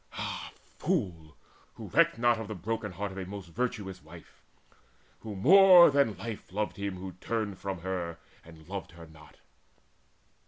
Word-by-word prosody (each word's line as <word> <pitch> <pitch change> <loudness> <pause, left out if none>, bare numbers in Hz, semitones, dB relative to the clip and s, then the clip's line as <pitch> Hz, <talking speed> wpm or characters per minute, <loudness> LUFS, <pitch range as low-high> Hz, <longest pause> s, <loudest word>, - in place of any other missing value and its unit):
Ah - - -5 0.3
fool, 80 -5 -2 0.4
who - - -9
recked - - +3
not 120 -1 +3
of 110 - -6
the 110 - -5
broken 105 +2 -4
heart 100 +2 -4
Of 95 - -7
a 95 - -4
most 100 -2 -8
virtuous 105 -3 -3
wife, - - -15 0.8
who 110 -2 -7
more 180 - +8
than 140 -8 +2
life 110 +1 -7
Loved 105 +2 -3
him 100 -1 -3
who 95 +1 -7
turned 110 -4 -3
from 95 -3 -5
her 90 -3 -4 0.3
and 80 -1 -15
loved 95 -2 -6
her 85 -1 -12
not!" 80 -1 -17
100 Hz, 160 wpm, -29 LUFS, 90-115 Hz, 0.8 s, more